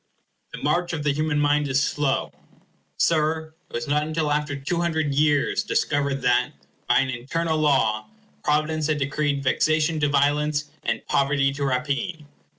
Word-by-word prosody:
The - - -7
march 175 +4 0
of 155 -2 -3
the 145 - +2
human 155 0 0
mind 145 0 +2
is 135 0 +2
slow. 145 -2 0 0.7
Sir, 160 0 +1 0.2
it - - -23
was 120 0 -3
not 145 +1 +2
until 155 0 -1
after 150 0 -1
two 145 +5 -2
hundred 160 -4 0
years 145 +5 +2
discovered 140 -9 -1
that, 125 -1 +2 0.3
by - - +4
an 135 - -1
eternal 155 +7 -2
law, 110 -8 +2 0.4
providence 155 +1 +1
had 155 -1 +1
decreed 145 0 -1
vexation 155 +3 +1
to 145 -1 +2
violence, 145 +1 +1
and - - -2
poverty 140 0 +1
to 140 +1 -4
rapine. 140 +4 -2
150 Hz, 155 wpm, -24 LUFS, 140-155 Hz, 0.7 s, by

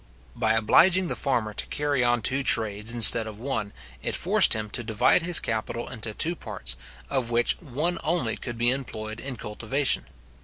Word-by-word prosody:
By 110 - +1
obliging 175 - +3
the - - -1
farmer 120 -6 -2
to - - -1
carry 145 -3 -1
on 120 -2 +1
two 135 +5 +3
trades 110 -3 +2
instead 115 -1 +5
of 105 -1 -10
one, 115 -5 -4 0.3
it - - -2
forced - - +5
him 110 -1 -4
to 120 - 0
divide 110 +9 +2
his 175 0 +5
capital 115 +1 -4
into 110 -3 -5
two 170 +2 +2
parts, 80 - -6 0.3
of 130 -4 -2
which 120 0 +1
one 160 +4 -3
only 155 -9 -1
could 120 -1 -7
be 120 +1 +1
employed 110 -4 -5
in 135 -1 -6
cultivation. 115 +6 -1
120 Hz, 180 wpm, -25 LUFS, 110-140 Hz, 0.3 s, instead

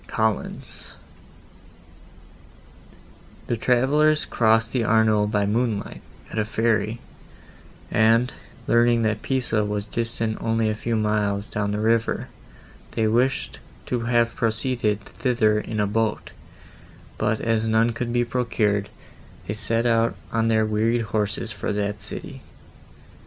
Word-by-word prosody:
COLLINS 110 -2 -3 2.5
The 120 - -1
travellers 145 +6 +2
crossed 115 0 +2
the 125 -3 +1
Arno 110 -1 +3
by 105 -1 +1
moonlight, 110 0 -1 0.3
at 110 - -2
a 105 - +1
ferry, 110 0 0 0.9
and, 115 +3 +3 0.3
learning 120 0 +3
that 110 -1 0
Pisa 120 -5 0
was 105 0 -2
distant 115 0 -2
only 115 -1 +1
a - - -1
few 115 +2 -2
miles 105 -1 0
down 105 -1 -2
the 105 - -1
river, 115 +1 +1 0.6
they 110 - +1
wished 125 +5 0 0.3
to 125 - -1
have 115 0 +1
proceeded 115 -2 0
thither 110 -2 +1
in 105 0 -4
a 105 - +3
boat, 110 +1 -1 0.9
but, 110 0 +1
as 115 -1 0
none 110 +1 +3
could 120 +1 -3
be 120 0 +1
procured, 110 -5 0 0.6
they 105 - -3
set 115 +2 -1
out 115 -1 +2 0.2
on 115 0 +1
their 110 -1 +3
wearied 110 +2 +1
horses 105 +1 -1
for 105 - -3
that 105 0 -2
city. - - -7
110 Hz, 125 wpm, -24 LUFS, 105-115 Hz, 2.5 s, Arno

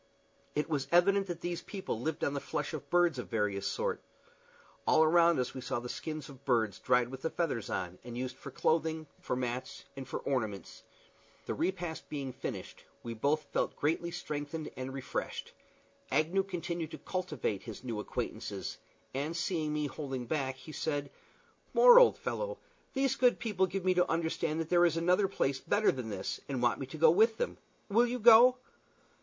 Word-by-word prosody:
It 150 - 0
was 145 -4 -1
evident 195 +3 +4
that 175 -2 -5
these 175 -1 -3
people 190 - -5
lived 155 +3 -2
on 140 - +1
the 140 - -1
flesh 150 +3 -3
of 155 - -6
birds 175 -6 +3
of 125 - -5
various 105 -3 0
sorts. 480 -1 -2 0.8
All 160 - +6
around 170 +1 +5
us 125 -1 -1
we 130 - -6
saw 125 - -2
the 120 +1 -7
skins 155 +2 -5
of 140 -1 -13
birds 115 -7 +1
dried 125 -1 +2
with 130 0 -8
the 160 - -1
feathers 145 - -2
on, 90 0 -3
and 120 -1 -7
used 130 0 -3
for - - -9
clothing, 160 0 0
for - - -2
mats, 125 0 -4
and 135 -2 -7
for - - -3
ornaments. 110 -8 -3 0.6
The - - -2
repast 175 -2 -3
being 140 -3 -4
finished, - - -6 0.2
we 115 - -4
both 145 +7 +1
felt - - 0
greatly 165 +3 0
strengthened 155 -2 -5
and 130 0 -5
refreshed. 130 -1 -4 0.6
Agnew 160 +7 +2
continued 175 -3 -4
to - - -7
cultivate 155 - -3
his 115 -1 -9
new 115 -4 -3
acquaintances, 110 -3 -4 0.3
and 150 +5 -2
seeing 165 -3 -1
me 150 0 0
holding 135 -3 -4
back, 135 0 -1
he 155 - -11
said, 145 -2 -2 0.6
"More, - - +10
old - - +6
fellow, - - -3 0.4
these 270 0 +2
good 250 -1 +4
people 210 -5 +1
give 185 +1 -4
me 185 - +4
to 180 0 +2
understand 160 -1 0
that 160 - -5
there 175 -1 +5
is 165 -1 -1
another 180 +4 +3
place 135 -8 0
better 210 +7 +3
than 125 -4 -5
this, 100 -3 -4
and 135 -2 -1
want 120 -2 +2
me 135 - -4
to 145 - -8
go 160 0 +7
with 220 +6 +4
them. - - -2 0.3
Will 230 +4 +4
you 245 +1 -2
go?" 240 +2 +8
155 Hz, 185 wpm, -32 LUFS, 130-175 Hz, 0.8 s, More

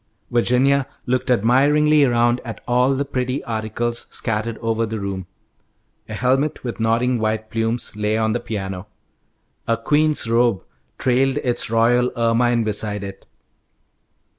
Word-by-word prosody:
Virginia 130 +3 +2 0.2
looked 130 0 -1
admiringly 145 +6 +4
around 120 -1 +2
at 115 -3 -7
all 125 +2 +3
the 140 +2 -1
pretty 130 0 -2
articles 115 +1 -3
scattered 110 0 -2
over 115 0 -1
the 110 -1 -3
room. 95 -2 -5 0.8
A 110 - -5
helmet 135 +6 0
with 120 -2 -5
nodding 115 +2 +1
white 110 0 -2
plumes 115 0 -2
lay 105 +1 0
on 110 -1 +1
the 120 - -1
piano. 100 -5 -5 0.8
A 115 - +2
queen's 150 +3 +2
robe 115 -3 +2 0.3
trailed 130 +1 +1
its 120 -3 0
royal 120 +2 +3
ermine 115 0 +2
beside 105 -1 -2
it. 100 -1 -9
120 Hz, 135 wpm, -21 LUFS, 110-125 Hz, 0.8 s, admiringly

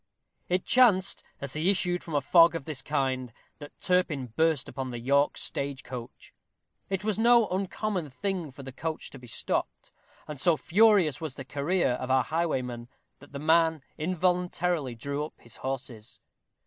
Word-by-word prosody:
It 180 +1 0
chanced, 220 -7 +4 0.2
as 140 -2 -4
he 155 +5 +1
issued 180 -2 +1
from 160 - -5
a 145 - +3
fog 165 +3 +6
of 145 - -4
this 150 -4 -3
kind, 130 -4 -1 0.3
that 145 -1 -12
Turpin 150 -10 0
burst 160 -4 +2
upon 130 0 -5
the 120 - -5
York 140 +4 +2
stage 140 -1 -3
coach. 120 -2 -9 0.6
It 195 0 -2
was 215 0 -1
no 235 -1 +5
uncommon 190 -2 -2
thing 175 +4 -3
for 135 +1 -11
the 135 - -7
coach 160 +4 -5
to 135 - -11
be 125 - -13
stopped; 115 - -3 0.4
and 150 -3 -6
so 170 -3 +4
furious 195 -5 +4
was 155 -5 -4
the 135 - -7
career 145 +6 0
of 125 +1 -3
our 130 -1 +4
highwayman, 125 -7 -2 0.3
that - - -16
the 140 - -6
man 160 0 +3
involuntarily 175 -4 0
drew 140 +5 -3
up 150 - -8
his 120 - -10
horses. 125 -4 -6
155 Hz, 170 wpm, -28 LUFS, 130-180 Hz, 0.6 s, fog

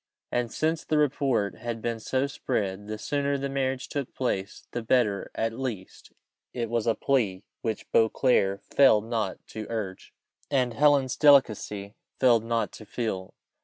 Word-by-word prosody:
And 120 -2 -1
since 160 +4 0
the 155 - 0
report 135 -8 +1
had 120 0 -4
been 115 0 -2
so 130 +4 0
spread, 105 -7 -3
the 110 0 -4
sooner 140 +5 -1
the 140 0 -3
marriage 135 -1 -1
took 140 -3 -4
place 100 -6 -2
the 120 - -3
better; 110 -4 +1
at 115 0 -1
least, 115 -7 -6 0.4
it 115 -2 -2
was 115 -1 0
a 115 - +3
plea 105 -8 0 0.2
which 110 -2 -3
Beauclerc 110 -3 +3
failed 110 -6 +4
not 110 -5 -3
to 110 -1 -6
urge, 105 -5 -5 0.4
and 125 -4 +1
Helen's 140 -1 +3
delicacy 110 -8 +3 0.3
failed 120 -4 +5
not 115 0 -1
to 110 - -11
feel. 105 -5 -4
115 Hz, 155 wpm, -27 LUFS, 105-135 Hz, 0.4 s, failed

